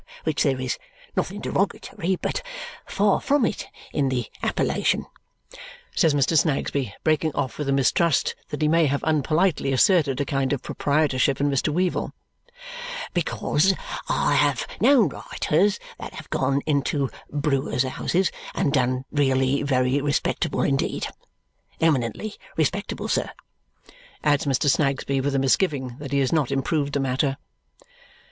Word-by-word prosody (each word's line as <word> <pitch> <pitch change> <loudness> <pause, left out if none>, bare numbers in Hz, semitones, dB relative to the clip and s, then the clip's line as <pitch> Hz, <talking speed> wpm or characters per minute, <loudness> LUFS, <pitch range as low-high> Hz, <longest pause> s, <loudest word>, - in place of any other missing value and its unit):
Which 155 -2 0
there 135 -3 +2
is 130 -1 -2 0.4
nothing - - -2
derogatory, 185 +3 -1
but - - -3 0.5
far 200 0 +2
from 285 -3 +2
it 215 - -3 0.3
in 140 -3 +1
the 125 -3 -1 0.2
appellation," - - 0 0.9
says 155 -3 +3
Mr. 145 +3 +2
Snagsby, 140 - +1
breaking 155 -1 +1
off 130 - -2
with 145 -2 -2
a - - +3
mistrust 140 +3 +2 0.2
that - - -3
he - - +4
may 165 0 +4
have 140 +1 -1
unpolitely 155 0 +1
asserted 140 -1 +3
a 145 - 0
kind 135 0 0
of 135 - -3
proprietorship 140 -2 +1
in 145 0 +2
Mr. 140 +3 +1
Weevle, 180 +3 0 1.0
"because 175 +1 +1 0.3
I - - +2
have - - +2
known 265 -7 +5
writers 195 +6 0 0.2
that - - -8
have - - -10
gone 135 +1 +1
into 140 -2 0 0.2
brewers' 140 -3 0
houses 170 +8 0 0.2
and 140 - +1
done 130 -1 +1
really 135 -1 +2
very 130 -1 +1
respectable 145 0 0
indeed. 70 - 0 0.7
Eminently 160 - 0 0.2
respectable, - - -1
sir," - - 0 0.9
adds 145 -1 +2
Mr. 135 +1 +1
Snagsby 140 -1 +1
with 140 +1 -1
a - - +3
misgiving 135 -2 +1
that 140 -2 -7
he 140 - +1
has 130 - +1
not 150 -6 +2
improved 140 +1 0
the 140 - +1
matter. 135 +1 0
140 Hz, 140 wpm, -24 LUFS, 135-155 Hz, 1.0 s, known